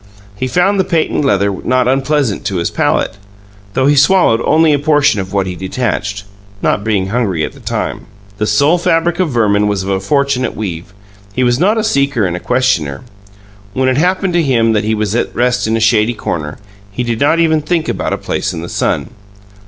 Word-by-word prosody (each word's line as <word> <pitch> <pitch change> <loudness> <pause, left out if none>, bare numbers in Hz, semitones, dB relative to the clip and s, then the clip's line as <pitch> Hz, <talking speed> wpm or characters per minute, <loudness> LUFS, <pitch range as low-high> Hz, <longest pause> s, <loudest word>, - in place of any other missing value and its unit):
He 130 +6 -3
found 185 +8 +1
the - - +4
patent 165 -4 0
leather 100 -6 +1
not 130 0 +1
unpleasant 135 -3 0
to 100 -2 -2
his 85 -1 -1
palate, - - 0 0.6
though 130 - +2
he 145 +1 +4
swallowed 145 -5 +4
only 155 0 +4
a 145 - +1
portion 145 -5 +2
of 95 -1 -5
what 100 -1 0
he 90 -1 -5
detached, 100 +1 -3 0.4
not 100 - 0
being 100 -3 0
hungry 100 -8 -1
at - - -6
that - - -15
time. - - -3 0.3
The 105 - 0
soul 145 +12 +3
fabric 170 +1 +1
of 185 -3 +1
Verman 105 -5 +2
was 100 -2 -1
of 95 - -5
a 95 -1 0
fortunate 140 +3 0
weave; 90 -3 -5 0.4
he 130 - +1
was 120 0 +2
not 205 +6 +2
a 220 - 0
seeker 140 - +1
and 90 -1 -3
questioner. 120 - 0 0.7
When 130 0 0
it 130 - 0
happened 180 +3 +1
to 175 - +3
him 115 -6 +2
that 105 0 +1
he 110 +1 0
was 105 -1 -2
at 120 - -2
rest 125 -1 +1
in 110 +1 +1
a - - -1
shady 110 +1 +2
corner, 75 -7 -4 0.3
he 125 +5 -3
did 120 -2 -2
not 150 +4 +3
even 160 -2 +2
think 165 +1 -1
about - - -2
a - - -1
place - - -3
in 80 - -6
the 85 - -7
sun. - - -1
125 Hz, 205 wpm, -14 LUFS, 100-150 Hz, 0.7 s, the